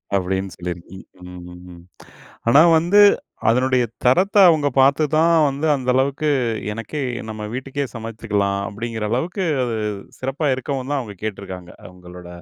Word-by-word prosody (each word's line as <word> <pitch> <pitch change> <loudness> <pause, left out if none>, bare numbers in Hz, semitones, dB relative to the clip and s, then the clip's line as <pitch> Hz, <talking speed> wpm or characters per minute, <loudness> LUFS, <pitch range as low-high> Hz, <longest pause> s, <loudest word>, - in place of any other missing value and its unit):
அப்பிடின்னு 95 0 -2
சொல்லியிருக்கீங்க. 90 +1 -8 0.2
ம். 90 0 -10
ம். 90 - -12
ம். 85 - -14 0.7
ஆனா, 140 +6 +7 0.2
வந்து 180 +6 +4 0.5
அதனுடைய 125 +1 +2 0.2
தரத்த 185 +12 +3
அவுங்க 150 -3 +2
பார்த்து 140 +3 +4
தான் 165 +1 +4
வந்து 140 +4 -2
அந்த 130 -2 -4
அளவுக்கு 140 +3 0 0.5
"எனக்கே 115 +7 -5 0.3
நம்ம 110 -1 -6
வீட்டுக்கே 135 +2 -3
சமைச்சுக்கலாம்." 105 -3 -2
அப்பிடிங்கிற 110 +1 -4
அளவுக்கு 175 - -2 0.2
அது 115 -2 -2 0.4
சிறப்பா 135 +4 -2
இருக்கவுந்தான் 135 +1 -3
அவுங்க 105 -4 -9
கேட்டிருக்காங்க. 95 -4 -7 0.2
அவுங்களோட 90 -1 -13
120 Hz, 130 wpm, -20 LUFS, 100-140 Hz, 0.7 s, ஆனா